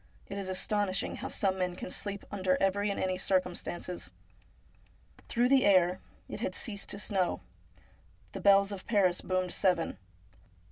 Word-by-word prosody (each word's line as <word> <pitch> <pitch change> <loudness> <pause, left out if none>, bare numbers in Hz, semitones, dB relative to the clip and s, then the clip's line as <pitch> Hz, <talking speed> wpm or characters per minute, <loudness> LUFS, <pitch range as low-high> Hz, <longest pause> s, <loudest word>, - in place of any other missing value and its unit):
It 200 0 -6
is 190 -1 -4
astonishing 195 +1 0
how - - -5
some 190 -1 0
men 180 -1 -1
can 180 - -7
sleep 200 -1 -3
under 185 -2 +1
every 200 +2 +1
and 200 - -2
any 185 -1 -1
circumstances. 180 - -2 1.2
Through 240 +1 +2
the 270 -1 +5
air 185 -2 +4
— - - -32
it - - -6
had - - -2
ceased 205 -5 -3
to - - -6
snow 195 -3 0 0.4
— - - -31
the - - -6
bells 200 0 +5
of 195 -2 -7
Paris 195 -5 +3
boomed 185 -1 -1
seven. 180 -4 +1
190 Hz, 160 wpm, -31 LUFS, 185-200 Hz, 1.2 s, the